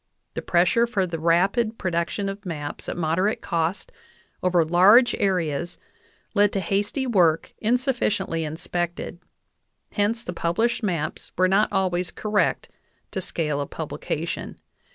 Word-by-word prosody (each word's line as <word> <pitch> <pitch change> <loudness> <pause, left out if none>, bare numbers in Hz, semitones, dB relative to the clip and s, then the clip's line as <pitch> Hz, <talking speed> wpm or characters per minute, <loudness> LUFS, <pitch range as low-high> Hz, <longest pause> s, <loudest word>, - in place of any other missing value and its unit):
The - - -4
pressure 180 +7 +3
for 200 -5 0
the 170 -2 -4
rapid 195 +8 +2
production 185 +2 -1
of 195 +1 -5
maps 150 -6 -5
at - - -4
mod 165 0 0
erate 205 +4 +1
cost 170 +3 -2 0.5
over 180 -2 +3
large 200 +9 +6
areas 175 -4 0 0.6
led 205 -1 +4
to 195 - 0
hasty 205 - -1
work 175 -9 +2
insufficiently 225 -8 0
in 155 0 -4
spected; 175 0 -3 0.7
hence 225 +3 0
the 180 - -5
published 225 +10 0
maps 175 -8 -3
were 185 +1 +4
not 195 +3 +3
always 180 -2 0
correct 210 +2 0 0.4
to 190 - -3
scale 150 -5 -2
of 140 - -5
publication. - - -4
185 Hz, 135 wpm, -24 LUFS, 170-205 Hz, 0.7 s, large